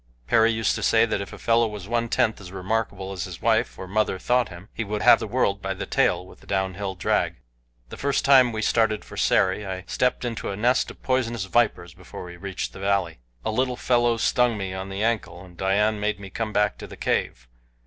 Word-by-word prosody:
Perry 110 Hz, -, +4 dB
used 115 Hz, 0 st, +1 dB
to -, -, -4 dB
say 115 Hz, 0 st, +4 dB
that 110 Hz, -3 st, -2 dB
if 100 Hz, -, -7 dB
a -, -, -9 dB
fellow 115 Hz, 0 st, +2 dB
was 105 Hz, -3 st, -7 dB
one 115 Hz, 0 st, 0 dB
tenth 110 Hz, -2 st, +1 dB
as 90 Hz, -2 st, -10 dB
remarkable 95 Hz, 0 st, -2 dB
as 90 Hz, -3 st, -4 dB
his 90 Hz, -4 st, -8 dB
wife -, -, +1 dB
or 95 Hz, -, -7 dB
mother 105 Hz, 0 st, 0 dB
thought 120 Hz, +3 st, +1 dB
him, 85 Hz, +3 st, -11 dB
he 115 Hz, -, -3 dB
would 105 Hz, 0 st, -3 dB
have -, -, +7 dB
the -, -, -4 dB
world 100 Hz, 0 st, 0 dB
by 95 Hz, 0 st, -3 dB
the -, -, -5 dB
tail 90 Hz, -, +1 dB
with -, -, -16 dB
a -, -, -19 dB
down 95 Hz, -1 st, 0 dB
hill 95 Hz, 0 st, -4 dB
drag. 90 Hz, -, 0 dB, 0.5 s
The -, -, -9 dB
first 140 Hz, 0 st, 0 dB
time 130 Hz, -3 st, +6 dB
we 110 Hz, -1 st, -3 dB
started 110 Hz, -1 st, +1 dB
for -, -, -11 dB
Sari 95 Hz, +3 st, +2 dB
I 95 Hz, -2 st, -5 dB
stepped 125 Hz, +3 st, 0 dB
into 115 Hz, -2 st, -3 dB
a 100 Hz, -, -3 dB
nest 125 Hz, +4 st, +2 dB
of -, -, -13 dB
poisonous 120 Hz, -5 st, 0 dB
vipers 90 Hz, -6 st, +1 dB
before -, -, -10 dB
we 85 Hz, 0 st, -9 dB
reached 95 Hz, +2 st, -5 dB
the -, -, -10 dB
valley. 100 Hz, -8 st, 0 dB, 0.3 s
A -, -, 0 dB
little 125 Hz, +2 st, 0 dB
fellow 120 Hz, -2 st, +2 dB
stung 120 Hz, 0 st, +2 dB
me 95 Hz, -2 st, -4 dB
on 95 Hz, +1 st, -5 dB
the 95 Hz, +2 st, -3 dB
ankle, 110 Hz, -5 st, -2 dB
and 90 Hz, -1 st, -16 dB
Dian 105 Hz, +4 st, +1 dB
made 105 Hz, -1 st, -1 dB
me 100 Hz, -1 st, -9 dB
come 115 Hz, -1 st, -3 dB
back 105 Hz, -1 st, +1 dB
to -, -, -8 dB
the -, -, -11 dB
cave. 60 Hz, +1 st, -1 dB
105 Hz, 235 wpm, -24 LUFS, 95-115 Hz, 0.5 s, have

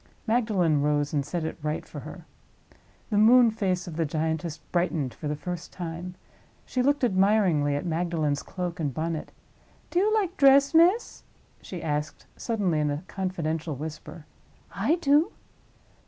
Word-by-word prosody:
Magdalen 210 Hz, -, +2 dB
rose, 145 Hz, 0 st, 0 dB
and 145 Hz, -2 st, +1 dB
set 165 Hz, +4 st, -3 dB
it 160 Hz, -, -5 dB
right 150 Hz, +1 st, -3 dB
for -, -, -8 dB
her. -, -, -10 dB, 0.9 s
The 205 Hz, -, +3 dB
moon 235 Hz, +2 st, +7 dB
face 190 Hz, -4 st, -1 dB
of 170 Hz, -3 st, -7 dB
the 165 Hz, -, +2 dB
giantess 160 Hz, +1 st, -2 dB
brightened 165 Hz, -8 st, -2 dB
for 150 Hz, -, -6 dB
the 150 Hz, -, -1 dB
first 175 Hz, +2 st, -6 dB
time. 175 Hz, +1 st, -6 dB, 0.5 s
She 255 Hz, -, -1 dB
looked 285 Hz, +2 st, +1 dB
admiringly 190 Hz, -9 st, +3 dB
at 145 Hz, -, -3 dB
Magdalen's 160 Hz, -4 st, -1 dB
cloak 180 Hz, -2 st, -5 dB
and 150 Hz, -4 st, -1 dB
bonnet. 160 Hz, +3 st, -3 dB, 0.6 s
"Do 345 Hz, -, +2 dB
you 415 Hz, +3 st, +2 dB
like 390 Hz, -4 st, 0 dB
dress, 275 Hz, +1 st, +6 dB
miss?" 355 Hz, +8 st, +3 dB, 0.4 s
she 180 Hz, -3 st, -7 dB
asked, 150 Hz, -1 st, -3 dB
suddenly, 200 Hz, -9 st, -1 dB
in 150 Hz, -1 st, +1 dB
a 145 Hz, +3 st, -3 dB
confidential 165 Hz, -5 st, -3 dB
whisper. 155 Hz, +2 st, -8 dB, 0.5 s
"I 220 Hz, -, +1 dB
do." 310 Hz, +2 st, +2 dB
175 Hz, 155 wpm, -26 LUFS, 155-220 Hz, 0.9 s, moon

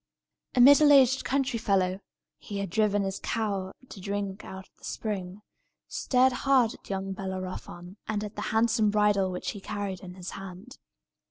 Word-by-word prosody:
A -, -, +2 dB
middle 285 Hz, +3 st, +8 dB
aged 265 Hz, -1 st, +5 dB
country 265 Hz, -3 st, 0 dB
fellow 190 Hz, -2 st, +1 dB, 0.4 s
(he 205 Hz, -, -7 dB
had 200 Hz, -3 st, -3 dB
driven 205 Hz, 0 st, +2 dB
his 195 Hz, 0 st, -3 dB
cow 200 Hz, -4 st, -2 dB, 0.2 s
to 195 Hz, -, -10 dB
drink 200 Hz, 0 st, -4 dB
out 190 Hz, 0 st, -9 dB
of -, -, -47 dB
the -, -, -28 dB
spring) 200 Hz, -2 st, -5 dB, 0.4 s
stared 255 Hz, 0 st, +2 dB
hard 255 Hz, -3 st, +3 dB
at -, -, -16 dB
young 195 Hz, 0 st, -3 dB
Bellerophon, 185 Hz, -1 st, -6 dB
and 215 Hz, -1 st, -2 dB
at 210 Hz, 0 st, -7 dB
the -, -, -4 dB
handsome 220 Hz, -1 st, +3 dB
bridle 205 Hz, -2 st, +2 dB
which 180 Hz, -, -3 dB
he 205 Hz, -, -9 dB
carried 200 Hz, -2 st, -4 dB
in 180 Hz, -2 st, -10 dB
his 185 Hz, -1 st, -7 dB
hand. 195 Hz, +6 st, -10 dB
205 Hz, 170 wpm, -28 LUFS, 190-225 Hz, 0.4 s, middle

